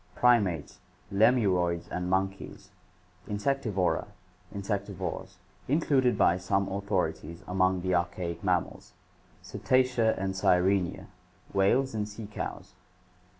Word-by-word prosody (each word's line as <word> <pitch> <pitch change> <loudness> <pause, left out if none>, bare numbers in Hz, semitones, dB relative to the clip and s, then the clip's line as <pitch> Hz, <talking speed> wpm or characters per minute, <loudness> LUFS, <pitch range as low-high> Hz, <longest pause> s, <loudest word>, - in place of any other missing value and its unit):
Primates, 100 -11 +2 0.3
lemuroids 95 -6 +3
and 90 0 -3
monkeys. 95 +1 -2 0.6
Insectivora, 105 -3 0 0.4
insectivores, 100 0 -4 0.3
included 135 -3 +2
by 85 - +4
some 95 +1 0
authorities 95 -4 -2
among 95 0 +1
the 95 0 -1
archaic 85 +1 -2
mammals. 90 -3 -1 0.5
Cetacea 125 -3 +1
and 95 0 -2
Sirenia, 95 0 +2 0.5
whales 115 +7 +2
and 105 -1 -2
sea 105 +1 -8
cows. 105 - -6
95 Hz, 95 wpm, -29 LUFS, 90-110 Hz, 0.6 s, by